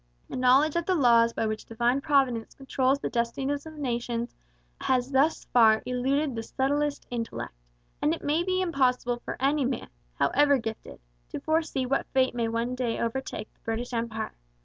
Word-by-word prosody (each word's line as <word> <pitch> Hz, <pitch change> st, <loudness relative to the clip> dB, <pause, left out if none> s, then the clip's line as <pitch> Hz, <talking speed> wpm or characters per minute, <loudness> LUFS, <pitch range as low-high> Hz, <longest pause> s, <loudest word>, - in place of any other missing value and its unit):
A -, -, -4 dB
knowledge 265 Hz, +5 st, +4 dB
of 340 Hz, -1 st, -1 dB
the 375 Hz, -, +3 dB
laws 235 Hz, -5 st, +5 dB
by 225 Hz, -, -2 dB
which 215 Hz, 0 st, -3 dB
Divine 240 Hz, +4 st, +1 dB
Providence 270 Hz, -6 st, +1 dB
controls 270 Hz, 0 st, +1 dB
the -, -, -4 dB
destinies 265 Hz, +5 st, -1 dB
of 315 Hz, -, -10 dB
nations 240 Hz, -4 st, -3 dB, 0.5 s
has 255 Hz, 0 st, 0 dB
thus 280 Hz, +4 st, +2 dB
far 220 Hz, -2 st, +5 dB
eluded 265 Hz, +3 st, 0 dB
the 225 Hz, -, -3 dB
subtlest 285 Hz, +5 st, -1 dB
intellect, 230 Hz, -2 st, -4 dB, 0.5 s
and 300 Hz, -, +2 dB
it 330 Hz, -, -3 dB
may 300 Hz, +3 st, +1 dB
be 370 Hz, +1 st, 0 dB
impossible 250 Hz, -7 st, +1 dB
for -, -, -5 dB
any 280 Hz, +2 st, +2 dB
man, 255 Hz, -1 st, -2 dB, 0.3 s
however 285 Hz, -, +3 dB
gifted, 225 Hz, -, -6 dB, 0.3 s
to -, -, -5 dB
foresee 315 Hz, -4 st, 0 dB
what 275 Hz, +2 st, 0 dB
fate 260 Hz, -1 st, +3 dB
may 235 Hz, -1 st, -1 dB
one 230 Hz, +2 st, -1 dB
day 250 Hz, -2 st, -1 dB
overtake 235 Hz, -1 st, -4 dB
the -, -, -38 dB
British 230 Hz, +2 st, -4 dB
Empire. 230 Hz, -2 st, -3 dB
255 Hz, 170 wpm, -27 LUFS, 235-285 Hz, 0.5 s, laws